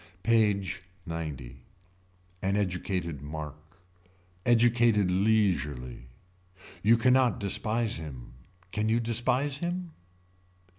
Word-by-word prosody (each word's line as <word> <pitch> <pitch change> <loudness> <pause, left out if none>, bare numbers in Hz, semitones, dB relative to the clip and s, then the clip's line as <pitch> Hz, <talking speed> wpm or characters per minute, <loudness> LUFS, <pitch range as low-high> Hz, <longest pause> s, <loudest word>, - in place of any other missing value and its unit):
PAGE 105 -5 +2 0.3
XC. 75 -6 -5 0.8
An 100 +2 +1
educated 90 -5 -2
mark. 75 +2 -8 0.7
Educated 115 -4 +4
leisurely. 75 - 0 0.7
You 115 +3 +5
can 125 +2 +4
not 130 -2 +3
despise 110 +2 -1
him. 70 -7 -8 0.4
Can 105 +1 0
you 115 +1 +3
despise 125 +5 0
him. 175 0 -3
100 Hz, 90 wpm, -29 LUFS, 80-115 Hz, 0.8 s, You